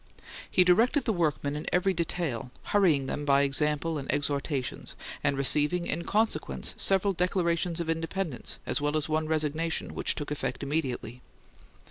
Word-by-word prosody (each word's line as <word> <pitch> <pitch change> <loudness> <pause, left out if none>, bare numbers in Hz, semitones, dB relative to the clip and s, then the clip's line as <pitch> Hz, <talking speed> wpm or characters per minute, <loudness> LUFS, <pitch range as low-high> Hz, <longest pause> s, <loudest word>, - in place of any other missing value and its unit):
He 180 - +5
directed 230 - +3
the 225 - +1
workmen 150 -4 -1
in 150 - -6
every 185 +2 +2
detail, 160 -7 -3
hurrying 170 -10 +2
them 145 +2 -4
by 140 -1 +3
example 150 +3 +1
and 135 - -3
exhortations, 140 - -2 0.3
and 140 -1 +1
receiving, 150 +5 +4
in 170 +1 -2
consequence, 220 +2 0
several 195 +1 +2
declarations 175 -1 0
of 170 - -3
independence, 165 -2 -2
as - - -1
well 150 +1 0
as 150 - -1
one 155 0 -1
resignation, 155 +1 0
which - - +1
took 145 0 -5
effect 140 -2 -3
immediately. 130 -5 -3
155 Hz, 150 wpm, -28 LUFS, 140-175 Hz, 0.3 s, He